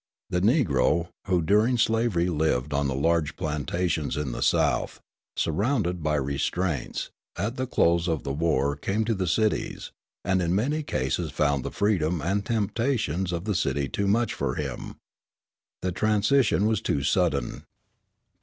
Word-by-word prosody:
The 90 - +1
Negro, 85 - +2 0.2
who 90 -3 +2
during 105 +8 +3
slavery 110 -6 +2
lived 75 -4 0
on 70 0 +1
the 65 - -2
large 80 +1 +1
plantations 80 +1 -2
in 75 -4 -2
the - - -5
South, - - +1 0.4
surrounded 90 - 0
by 75 0 0
restraints, 70 +3 -2 0.2
at 105 +7 -2
the 130 0 -2
close 85 -6 +2
of 80 -4 -1
the 70 - -3
war 70 -2 +1
came 100 +9 -1
to 115 - +1
the 95 -3 -2
cities, 110 +5 0 0.3
and 95 0 +2
in 85 +1 +1
many 145 +10 0
cases 80 - -2
found 70 -1 0
the - - -3
freedom 90 -5 +1
and 95 +7 0
temptations 110 - 0
of 85 -1 -3
the 105 - 0
city 70 -5 0
too 100 +8 -2
much 115 +2 +2
for 65 -2 -2
him. 70 -5 -5 0.9
The 90 - 0
transition 110 +3 +2
was 110 0 +1
too 70 - -1
sudden. 85 -3 0
85 Hz, 155 wpm, -26 LUFS, 75-105 Hz, 0.9 s, during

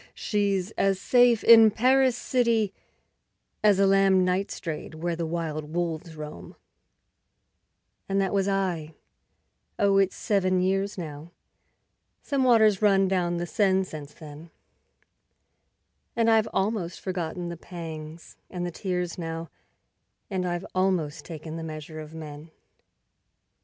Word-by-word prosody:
She's 200 -2 -1
as 195 -1 +2
safe 245 -1 +4
in 225 -1 +8
Paris 255 +3 +3
city 230 -6 +1 0.9
As 205 -2 +5
a 195 - +4
lamb 195 -1 +4
night 185 +2 0
strayed 160 -1 -6
where 170 +2 -2
the 165 -1 -3
wild 160 -2 -4
wolves 165 -1 -3
roam; 150 - -9 1.5
And 195 0 +1
that 195 0 0
was 195 -1 +1
I; 180 -6 -2 0.8
oh, 200 -1 +3
it's 195 -1 +1
seven 185 -4 +1
years 195 +2 0
now 155 -2 -7 0.9
(Some 275 -2 0
water's 220 -5 +4
run 195 -2 +4
down 175 -2 0
the 175 - -2
Seine 190 0 +2
since 150 -5 -9
then), 155 +1 -11 1.7
And 230 -1 +3
I've 220 0 +3
almost 190 -3 -1
forgotten 175 -1 -4
the 170 - -5
pangs 165 -2 -9
and 180 -1 -4
the 175 - -4
tears 180 -1 -3
now, 165 0 -5 0.8
And 185 -2 -1
I've 175 +1 -3
almost 185 -5 0
taken 160 -1 -7
the 165 - -6
measure 155 0 -7
of 155 +1 -9
men. 155 0 -9
180 Hz, 130 wpm, -26 LUFS, 165-200 Hz, 1.7 s, in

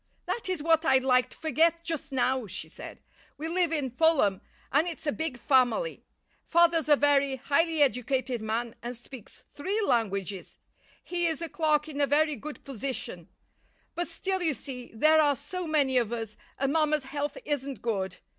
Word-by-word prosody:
"That 465 - -3
is 360 -6 -2
what 325 0 +3
I'd 265 -5 +4
like 255 -1 +3
to - - -13
forget 320 +2 +2
just 320 -4 -3
now," 255 -2 0
she - - -5
said. - - -10 0.3
"We 315 - -4
live 345 0 +1
in 290 -5 -1
Fulham, 260 - +3 0.3
and 295 +5 +3
it's 330 -2 -6
a 295 - +1
big 320 -4 -3
family. 265 - +2 0.4
Father's 335 -2 +3
a 295 - +8
very 280 -1 +3
highly 300 +4 +2
educated 255 -2 0
man 225 +2 -2
and 240 0 -6
speaks 245 -2 -13
three 385 +9 -3
languages. 200 -6 -1 0.5
He 345 -1 0
is 320 -3 -1
a 335 -1 -4
clerk 305 0 +1
in 290 -2 -4
a 285 - +3
very 300 +1 +2
good 295 +5 -9
position; 270 -1 -4 0.6
but 345 0 -2
still, 375 +3 -2
you 320 -5 +1
see, 250 -3 -7
there 310 +8 +4
are 290 -2 +3
so 340 +6 -6
many 280 -4 +2
of 235 -2 -2
us, 225 -3 -4 0.2
and 275 +1 0
mamma's 305 -2 +2
health 290 - -4
isn't 275 -6 -3
good. 195 -5 -2
285 Hz, 175 wpm, -28 LUFS, 250-320 Hz, 0.6 s, a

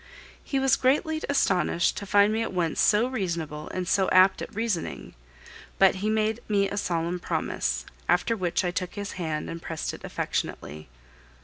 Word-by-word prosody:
He 275 - -2
was 270 0 +3
greatly 305 +4 +1
astonished 185 -10 +2
to 200 - -5
find 205 +2 +4
me 225 - 0
at 225 - -2
once 175 -3 0
so 215 +2 +4
reasonable 170 - -3
and 185 -1 -4
so 190 0 +2
apt 185 +1 +5
at - - -7
reasoning; 220 -6 -3 0.6
but 195 0 +5
he 210 - 0
made 220 +1 +1
me 200 -2 +2
a 200 - -5
solemn 175 -2 -1
promise, - - -2 0.2
after 180 +6 +2
which 185 -2 -1
I 175 - 0
took 180 0 -4
his 205 -1 -4
hand 160 -4 -3
and 165 0 -6
pressed 165 -1 -4
it - - -10
affectionately. 75 -1 -4
190 Hz, 175 wpm, -26 LUFS, 170-215 Hz, 0.6 s, apt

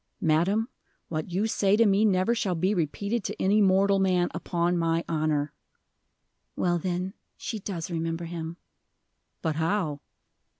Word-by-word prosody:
"Madam, 190 +6 +2 0.4
what 155 0 -3
you 190 +5 0
say 205 -2 +2
to 230 - +5
me 200 +1 +4
never 195 +1 +3
shall 205 -6 0
be 185 +5 +1
repeated 200 +6 -1
to - - -5
any 205 +3 +3
mortal 195 0 +4
man, 180 -2 +2
upon 175 0 0
my 165 0 +1
honor." 155 -2 0 1.0
"Well, 175 -1 +1
then, 180 +2 -2 0.2
she 220 - -4
does 185 -3 -5
remember 165 0 -2
him." 165 0 -5 0.9
"But 160 -3 0
how?" 160 -3 0
180 Hz, 140 wpm, -27 LUFS, 165-200 Hz, 1.0 s, to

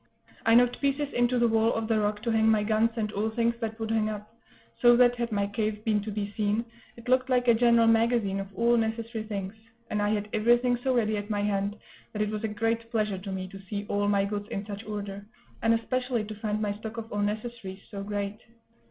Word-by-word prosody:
I 225 - +6
knocked 245 0 +4
pieces 280 +1 0
into 245 +1 +2
the 235 0 +4
wall 225 0 +3
of 225 -1 -2
the 220 -1 +2
rock 210 0 -1
to 235 - 0
hang 220 0 +3
my 215 -1 +3
guns 220 +2 +2
and 215 -2 -2
all 215 +1 -1
things 235 +1 +1
that 225 0 -3
would 220 0 -3
hang 220 -1 +1
up; 210 +1 -7 0.5
so 240 -1 +7
that, 245 -1 +6
had 235 -1 -2
my 200 -1 +1
cave 210 +1 -2
been 215 -2 +2
to 210 - -6
be 205 0 -4
seen, 215 +1 0 0.3
it 235 +1 -12
looked 255 +1 +2
like 250 -1 +2
a 235 - +7
general 235 0 +4
magazine 225 -3 +2
of 195 - -4
all 235 +2 +3
necessary 225 0 -2
things; 200 -2 -4 0.4
and 210 - 0
I 205 - +1
had 210 -1 -1
everything 240 +3 +3
so 260 -1 +1
ready 215 -3 +1
at 205 +1 -5
my 205 -1 0
hand 200 0 -1 0.4
that 210 - -2
it 210 - -2
was 215 0 -4
a - - +1
great 225 +2 -1
pleasure 215 -4 -1
to 195 +1 -6
me 185 -1 -4
to 195 +1 -10
see 205 -1 -3
all 205 0 +1
my 200 -1 +2
goods 205 0 -4
in 200 0 -4
such 205 0 -7
order, 205 -2 -5 0.4
and 225 - +3
especially 250 0 -1
to 215 +1 -6
find 215 0 -2
my 210 -1 -1
stock 220 +1 -7
of 225 0 -6
all 205 - -1
necessaries 210 -2 -4
so 200 -2 -5
great. 205 +1 -3
220 Hz, 240 wpm, -28 LUFS, 205-230 Hz, 0.5 s, so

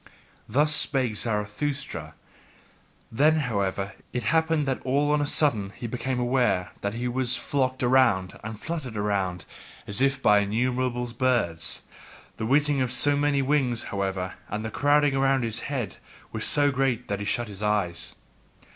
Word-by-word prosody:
Thus 150 +6 +3
spake 130 -6 +2
Zarathustra; 105 - -2 1.0
then, 150 +7 +4
however, 100 -5 -2 0.2
it 125 - -2
happened 160 +2 +2
that 135 -2 -2
all 140 +3 +1
on 150 0 +2
a 145 - 0
sudden 110 -11 +2
he - - -7
became 125 +2 -2
aware 120 -7 +1
that 100 +2 -2
he 120 +1 -2
was 125 0 +1
flocked 130 -2 -1
around 120 -8 +3
and 110 -1 -6
fluttered 145 -8 -5
around, 95 -5 -1 0.4
as 100 +2 -3
if 135 0 +2
by 105 -6 +5
innumerable 125 +4 0
birds, 115 -10 0 0.5
the 110 - -3
whizzing 145 +1 +3
of 125 -1 0
so 145 +3 +2
many 145 -1 +1
wings, 130 -4 +1
however, 95 -2 -2 0.2
and 105 +2 -4
the 110 - -4
crowding 145 +1 +3
around 135 -1 +2
his 115 -1 -2
head 120 - -3 0.3
was - - -1
so 145 -1 +3
great 130 -3 0
that 100 -1 -2
he 100 - -4
shut 120 +3 -1
his 100 -1 -8
eyes. 90 -6 -1
125 Hz, 155 wpm, -26 LUFS, 105-135 Hz, 1.0 s, by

